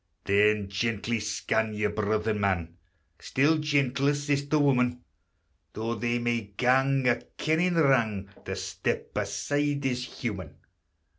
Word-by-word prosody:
Then 105 Hz, 0 st, +3 dB
gently 110 Hz, +3 st, -1 dB
scan 105 Hz, +1 st, -1 dB
your 105 Hz, 0 st, 0 dB
brother 110 Hz, +1 st, 0 dB
man, 95 Hz, -5 st, -1 dB, 0.4 s
Still 155 Hz, +4 st, +2 dB
gentler 145 Hz, -1 st, +1 dB
sister 145 Hz, +1 st, 0 dB
woman; 125 Hz, -4 st, +2 dB, 0.7 s
Though 115 Hz, +2 st, -2 dB
they 120 Hz, +2 st, -1 dB
may 120 Hz, -1 st, 0 dB, 0.2 s
gang 135 Hz, +2 st, +3 dB
a 120 Hz, -, +4 dB, 0.2 s
kennin' 170 Hz, +3 st, +1 dB
wrang, 115 Hz, -10 st, +2 dB, 0.2 s
To -, -, -3 dB
step -, -, -3 dB
aside 145 Hz, -1 st, -1 dB
is 125 Hz, -1 st, 0 dB
human. 100 Hz, -, -6 dB
120 Hz, 120 wpm, -28 LUFS, 105-140 Hz, 0.7 s, a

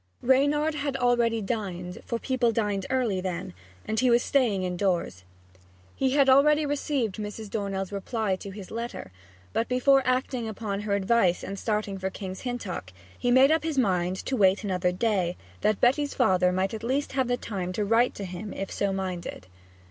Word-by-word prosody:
Reynard 285 Hz, +4 st, +3 dB
had 285 Hz, -2 st, -2 dB
already 235 Hz, -3 st, +2 dB
dined 185 Hz, -5 st, -4 dB
for 235 Hz, -, -1 dB
people 245 Hz, -1 st, +1 dB
dined 205 Hz, -4 st, -1 dB
early 240 Hz, -8 st, 0 dB
then 185 Hz, 0 st, -4 dB, 0.3 s
and 220 Hz, 0 st, -1 dB
he 255 Hz, +1 st, +3 dB
was 240 Hz, 0 st, +4 dB
staying 230 Hz, -9 st, +2 dB
indoors. 180 Hz, -, -1 dB, 0.7 s
He 265 Hz, -1 st, +1 dB
had 280 Hz, -1 st, +4 dB
already 295 Hz, +3 st, +5 dB
received 280 Hz, -7 st, -1 dB
Mrs. 210 Hz, 0 st, -6 dB
Dornell's 195 Hz, -2 st, -3 dB
reply 200 Hz, 0 st, -1 dB
to 200 Hz, -, -8 dB
his 195 Hz, -1 st, -9 dB
letter; 230 Hz, -, -5 dB, 0.4 s
but 230 Hz, -, 0 dB
before 270 Hz, +2 st, +4 dB
acting 255 Hz, -2 st, 0 dB
upon 205 Hz, -2 st, -4 dB
her 205 Hz, -1 st, -1 dB
advice 190 Hz, -2 st, +2 dB
and 195 Hz, 0 st, -5 dB
starting 210 Hz, -3 st, -2 dB
for 190 Hz, 0 st, -2 dB
King's 190 Hz, -1 st, -7 dB
Hintock 215 Hz, -, -5 dB, 0.2 s
he 245 Hz, -, -1 dB
made 260 Hz, +4 st, +6 dB
up 320 Hz, -, +3 dB
his 315 Hz, -3 st, -2 dB
mind 185 Hz, -6 st, +1 dB
to 265 Hz, -, -1 dB
wait 195 Hz, -2 st, +3 dB
another 180 Hz, -3 st, 0 dB
day, 185 Hz, -3 st, 0 dB, 0.2 s
that 215 Hz, -1 st, +2 dB
Betty's 280 Hz, +4 st, +2 dB
father 180 Hz, -1 st, +3 dB
might 190 Hz, +2 st, 0 dB
at 220 Hz, -, -5 dB
least 270 Hz, +4 st, -1 dB
have 250 Hz, -2 st, 0 dB
time 185 Hz, -4 st, -4 dB
to 210 Hz, +2 st, -1 dB
write 230 Hz, +4 st, +3 dB
to 200 Hz, -, -5 dB
him 185 Hz, +3 st, -6 dB
if 195 Hz, -, -5 dB
so 200 Hz, -1 st, 0 dB
minded. 185 Hz, -, -4 dB
215 Hz, 180 wpm, -27 LUFS, 190-255 Hz, 0.7 s, made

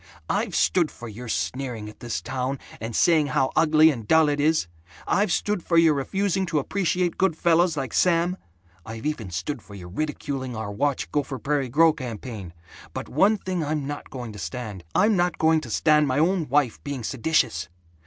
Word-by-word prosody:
I've -, -, -1 dB
stood 170 Hz, -4 st, +3 dB
for 120 Hz, -, -10 dB
your 115 Hz, +3 st, -8 dB
sneering 120 Hz, -2 st, -3 dB
at 105 Hz, -, -12 dB
this 110 Hz, -8 st, -4 dB
town, 130 Hz, +3 st, -2 dB, 0.2 s
and 115 Hz, 0 st, -5 dB
saying 160 Hz, -4 st, +4 dB
how 135 Hz, -1 st, +1 dB
ugly 160 Hz, 0 st, +5 dB
and 115 Hz, -7 st, -7 dB
dull 160 Hz, +2 st, +5 dB
it 145 Hz, 0 st, -1 dB
is. 155 Hz, -, +2 dB, 0.4 s
I've 200 Hz, -1 st, +1 dB
stood 205 Hz, 0 st, 0 dB
for 170 Hz, 0 st, +1 dB
your 165 Hz, -2 st, +6 dB
refusing 190 Hz, +7 st, -1 dB
to 160 Hz, -, 0 dB
appreciate 180 Hz, +3 st, 0 dB
good 185 Hz, -4 st, +2 dB
fellows 170 Hz, -1 st, +3 dB
like 135 Hz, -4 st, -3 dB
Sam. 175 Hz, +1 st, +2 dB, 0.5 s
I've 110 Hz, +2 st, -8 dB
even 140 Hz, -10 st, -2 dB
stood 110 Hz, -, -4 dB
for 100 Hz, -, -13 dB
your 90 Hz, -3 st, -9 dB
ridiculing 135 Hz, +1 st, -3 dB
our 110 Hz, -2 st, -4 dB
Watch 140 Hz, +7 st, -1 dB
Gopher 140 Hz, -2 st, -1 dB
Prairie 140 Hz, -1 st, -1 dB
Grow 160 Hz, +5 st, +5 dB
campaign. 115 Hz, -, -7 dB, 0.4 s
But -, -, -6 dB
one 200 Hz, +9 st, +3 dB
thing 185 Hz, -4 st, -3 dB
I'm 150 Hz, -1 st, -2 dB
not 145 Hz, +1 st, -6 dB
going 120 Hz, -4 st, -7 dB
to 105 Hz, -, -9 dB
stand: 95 Hz, +3 st, -6 dB
I'm 215 Hz, 0 st, +4 dB
not 175 Hz, -2 st, +1 dB
going 160 Hz, 0 st, +3 dB
to 125 Hz, -, -9 dB
stand 150 Hz, +5 st, +3 dB
my 130 Hz, 0 st, 0 dB
own 165 Hz, 0 st, +1 dB
wife 140 Hz, -3 st, +1 dB
being 140 Hz, -4 st, -4 dB
seditious. 115 Hz, -, 0 dB
145 Hz, 190 wpm, -25 LUFS, 120-165 Hz, 0.5 s, your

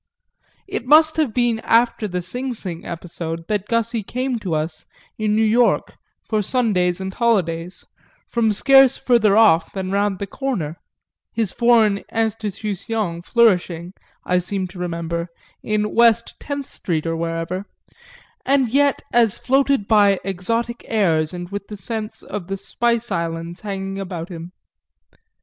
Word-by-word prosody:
XIV -, -, -43 dB, 0.2 s
It 240 Hz, -, -7 dB
must 310 Hz, +2 st, +6 dB
have 305 Hz, -7 st, +1 dB
been 240 Hz, -1 st, +1 dB
after 230 Hz, -1 st, +2 dB
the 180 Hz, -2 st, -3 dB
Sing 250 Hz, +7 st, -4 dB
Sing 175 Hz, -6 st, -6 dB
episode 165 Hz, -1 st, -6 dB
that 210 Hz, -2 st, -1 dB
Gussy 230 Hz, 0 st, 0 dB
came 250 Hz, +3 st, -2 dB
to 185 Hz, -6 st, -2 dB
us, 155 Hz, +1 st, -4 dB, 0.3 s
in 215 Hz, -1 st, +1 dB
New 220 Hz, -, +3 dB
York, 230 Hz, +2 st, +2 dB, 0.3 s
for 215 Hz, -2 st, 0 dB
Sundays 195 Hz, -6 st, +1 dB
and 190 Hz, 0 st, -5 dB
holidays, 180 Hz, -7 st, 0 dB, 0.4 s
from 230 Hz, -2 st, +1 dB
scarce 270 Hz, +4 st, +5 dB
further 220 Hz, -5 st, +3 dB
off 165 Hz, -7 st, +5 dB
than 190 Hz, -1 st, -4 dB
round 200 Hz, -1 st, +1 dB
the 200 Hz, -, -4 dB
corner 195 Hz, -, -3 dB, 0.5 s
his 225 Hz, -5 st, -1 dB
foreign 225 Hz, -4 st, +4 dB
Institution 215 Hz, -3 st, -2 dB
flourishing, 180 Hz, -5 st, +2 dB, 0.3 s
I 180 Hz, 0 st, +2 dB
seem 190 Hz, +1 st, -2 dB
to 180 Hz, +1 st, -11 dB
remember, 170 Hz, -1 st, -3 dB, 0.3 s
in 210 Hz, 0 st, -1 dB
West 235 Hz, 0 st, +4 dB
Tenth 285 Hz, -1 st, -4 dB
Street 165 Hz, -9 st, -3 dB
or 165 Hz, 0 st, -1 dB
wherever 165 Hz, +3 st, -3 dB, 0.8 s
and 270 Hz, -3 st, +2 dB
yet 280 Hz, +3 st, +2 dB
as 230 Hz, -4 st, +4 dB
floated 270 Hz, -4 st, +1 dB
by 205 Hz, -3 st, +4 dB
exotic 230 Hz, +6 st, -2 dB
airs 165 Hz, -8 st, +1 dB
and 175 Hz, 0 st, -6 dB
with 200 Hz, 0 st, -6 dB
the 210 Hz, -, -8 dB
scent 220 Hz, +1 st, -5 dB
of 195 Hz, -5 st, -6 dB
the 195 Hz, 0 st, -3 dB
spice 235 Hz, +3 st, -1 dB
islands 170 Hz, +1 st, -3 dB
hanging 195 Hz, -1 st, -4 dB
about 180 Hz, -3 st, -5 dB
him. 170 Hz, -1 st, -8 dB
205 Hz, 145 wpm, -21 LUFS, 175-235 Hz, 0.8 s, must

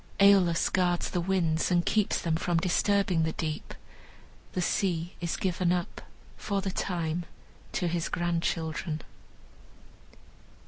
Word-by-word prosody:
Aeolus 195 Hz, -4 st, +5 dB
guards 175 Hz, -2 st, +1 dB
the 175 Hz, -, 0 dB
winds 170 Hz, -3 st, +1 dB
and 175 Hz, -1 st, +2 dB
keeps 210 Hz, -2 st, +2 dB
them 165 Hz, -2 st, 0 dB
from 170 Hz, +1 st, 0 dB
disturbing 185 Hz, 0 st, +2 dB
the 160 Hz, 0 st, 0 dB
deep. 155 Hz, -1 st, -4 dB, 0.8 s
The -, -, -2 dB
sea 175 Hz, -2 st, 0 dB
is 170 Hz, -1 st, -2 dB
given 180 Hz, -1 st, 0 dB
up, 180 Hz, -1 st, -2 dB, 0.4 s
for 200 Hz, -1 st, -1 dB
the 195 Hz, -1 st, -2 dB
time, 170 Hz, -2 st, -2 dB, 0.5 s
to 180 Hz, -, 0 dB
his 170 Hz, -1 st, -1 dB
grandchildren. 165 Hz, -2 st, -2 dB
175 Hz, 125 wpm, -29 LUFS, 165-185 Hz, 0.8 s, Aeolus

